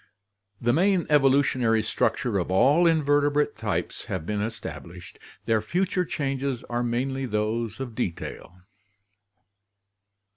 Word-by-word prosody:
The 120 0 +1
main 185 +1 +2
evolutionary 130 -5 +3
structure 110 0 0
of 90 - -3
all 140 - +4
invertebrate 145 -2 +2
types 110 -3 -3
having 90 -4 -4
been 105 +1 -2
established, 90 -5 -7 0.3
their 110 -1 +2
future 180 - 0
changes 135 -4 -2
are 120 0 -3
mainly 130 +3 -1
those 110 +1 -2
of 130 -3 -5
detail. 90 -4 -5
120 Hz, 110 wpm, -26 LUFS, 110-145 Hz, 0.3 s, all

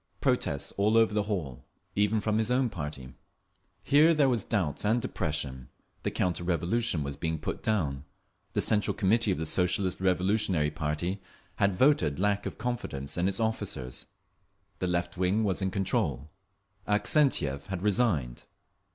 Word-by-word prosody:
Protests - - 0
all 105 +3 +3
over 115 -2 +4
the 105 - +2
hall, 80 - -3 0.3
even 105 +1 +2
from 110 +1 +1
his 110 +1 +1
own 125 -1 +2
party. 75 -5 -6 0.7
Here 155 +4 +5
there 145 -3 +4
was 120 -5 +1
doubt 85 -10 -1
and 110 +3 +2
depression. 75 - -3 0.3
The - - -1
counter 90 -1 -1
revolution 85 +1 0
was 70 0 -4
being 80 -1 -2
put - - -4
down. 75 -11 -1 0.5
The - - +1
Central 105 -2 +1
Committee 110 +2 +2
of 90 - 0
the 80 - -2
Socialist 90 +3 +1
Revolutionary 95 -4 +2
party 75 +6 -2 0.4
had 100 -2 +2
voted 90 - +3
lack 100 +2 0
of - - -7
confidence 95 - -4
in 90 +1 +1
its 100 0 -1
officers; 100 - -3 0.7
the 90 - -1
left 85 +1 -1
wing 95 +4 +1
was 100 -2 0
in 95 - +1
control; 90 -6 -1 0.6
Avksentiev 105 - +1
had 95 -2 -4
resigned. 100 - +1
95 Hz, 150 wpm, -29 LUFS, 80-110 Hz, 0.7 s, Here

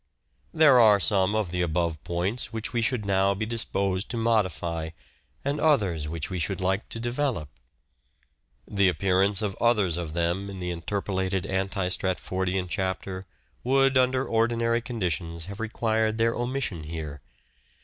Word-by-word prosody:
There 150 -5 +6
are 105 -3 +7
some 100 +1 +2
of 105 -5 0
the 90 0 -1
above 85 -2 -1
points 90 +8 -2
which 115 +1 -4
we 120 - +1
should 115 -2 0
now 100 0 +2
be 110 +2 -2
disposed 100 -4 -1
to 120 - -3
modify 90 -8 0 0.6
and 140 +1 0
others 95 - +2
which 80 -1 -3
we 95 -2 -4
should 95 +4 -1
like 95 +2 -1
to 115 - -6
develop. 120 - -2 1.2
The 100 -2 +3
appearance 95 +4 +2
of 100 -3 -2
others 105 -8 +3
of 80 -2 -5
them 85 +4 0
in 95 -1 -7
the 90 -1 -3
interpolated 95 +1 -2
anti 95 -1 -1
Stratfordian 95 0 -1
chapter 95 0 -3 0.4
would 135 +1 +3
under 130 0 +3
ordinary 115 +1 +1
conditions 85 - -3
have 100 +2 -8
required 110 -1 0
their 115 0 +2
omission 120 - -2
here. 75 -3 -6
95 Hz, 150 wpm, -26 LUFS, 90-115 Hz, 1.2 s, are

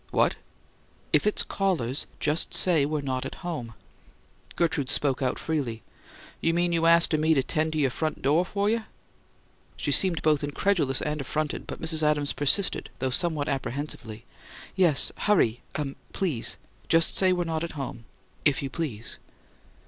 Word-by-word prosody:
"What?" - - +2 0.8
"If - - +4
it's 210 - +2
callers, 155 -10 -1
just 155 +3 0
say 160 -6 +3
we're 150 -1 -2
not 130 -2 -2
at - - -6
home." 125 -10 -5 0.8
Gertrude 155 -6 0
spoke 140 -3 +1
out 130 -1 0
freely: 130 -9 -3 0.6
"You 165 0 +1
mean 175 0 +2
you 165 -1 +2
astin' 165 -2 +5
me 160 +1 +3
to 135 - +2
'tend 155 +2 -1
you' 145 -3 +2
front 155 +2 -3
do' 150 +6 +3
fer 200 +2 -1
you?" 225 +1 +1 0.9
She - - -1
seemed 180 -4 +4
both 150 -2 +2
incredulous 145 -2 +1
and 150 -1 -2
affronted, 150 +2 -3
but - - -6
Mrs. 160 -1 +1
Adams 150 -1 +1
persisted, 145 +8 +2
though 130 -1 -1
somewhat 155 0 +1
apprehensively. 130 -5 -4 0.5
"Yes. 175 -7 +4
Hurry 125 - +2
uh 150 - -1 0.3
please. 160 -12 0 0.3
Just 165 -1 +4
say 185 -1 +4
we're 180 -1 +1
not 160 -1 -2
at 170 - -5
home 130 -5 -6 0.4
if 145 -2 +2
you 135 - -4
please." 130 -10 -4
155 Hz, 155 wpm, -26 LUFS, 135-170 Hz, 0.9 s, astin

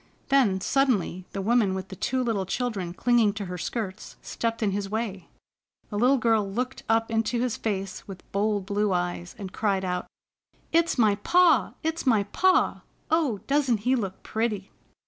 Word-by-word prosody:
Then, 230 -9 +3
suddenly, 205 -9 +1
the 195 - -4
woman 215 -3 +2
with 190 0 -5
the 190 - -7
two 255 +7 -1
little 210 -6 -1
children 205 -7 -2
clinging 230 +2 +3
to 205 -1 -5
her 180 -1 -6
skirts, 195 0 -5
stepped 230 -1 -2
in 205 - +2
his 195 0 -3
way. 210 -4 -3 0.6
The - - -4
little 255 +4 +4
girl 225 -5 +2
looked 250 +5 -3
up 225 0 +2
into 225 +2 0
his 245 -1 0
face 195 -5 -4
with 190 -3 -9
bold 205 -1 0
blue 205 0 0
eyes, 175 0 -2
and 190 -3 -7
cried 195 -3 0
out: 180 -1 -2 0.6
"It's 335 -1 +2
my 215 -4 +4
pa! 310 - +3
It's 320 -2 -2
my 220 -5 +4
pa! 370 - +2 0.3
Oh, 290 - +1
doesn't 270 -6 +1
he 255 +4 +2
look 195 -6 -4
pretty?" 220 -3 -2
215 Hz, 170 wpm, -26 LUFS, 195-245 Hz, 0.6 s, little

